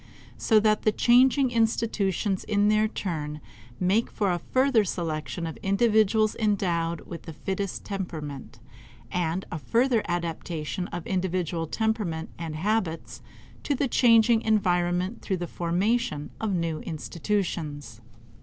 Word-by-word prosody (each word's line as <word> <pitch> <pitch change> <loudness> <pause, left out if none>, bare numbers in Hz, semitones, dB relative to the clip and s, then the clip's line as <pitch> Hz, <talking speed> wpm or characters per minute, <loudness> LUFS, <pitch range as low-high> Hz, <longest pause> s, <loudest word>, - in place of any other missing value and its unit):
So 220 -2 +4
that 215 0 +3
the 215 - +3
changing 255 +4 +4
institutions 220 -4 0
in 205 -1 +2
their 215 0 +3
turn 150 -8 -4 0.4
make 195 +6 +2
for 200 -3 0
a 175 - -1
further 260 -1 +2
selection 165 -2 -3
of 160 - -5
individuals 215 +1 +2
endowed 175 -6 0
with 170 - -8
the 160 - -6
fittest 195 +4 -4
temperament, 155 - -6 0.5
and 175 +1 -1
a 160 - -3
further 235 - +2
adaptation 170 0 -3
of 175 -1 -6
individual 180 -3 -1
temperament 210 -6 -2
and 165 -2 -4
habits 190 -1 -2 0.4
to 285 - 0
the 275 - 0
changing 230 -2 +5
environment 180 -1 +1
through 190 - -2
the 175 - -3
formation 175 -1 -1
of 220 -2 0
new 165 -2 -1
institutions. 155 - -3
190 Hz, 125 wpm, -26 LUFS, 165-220 Hz, 0.5 s, changing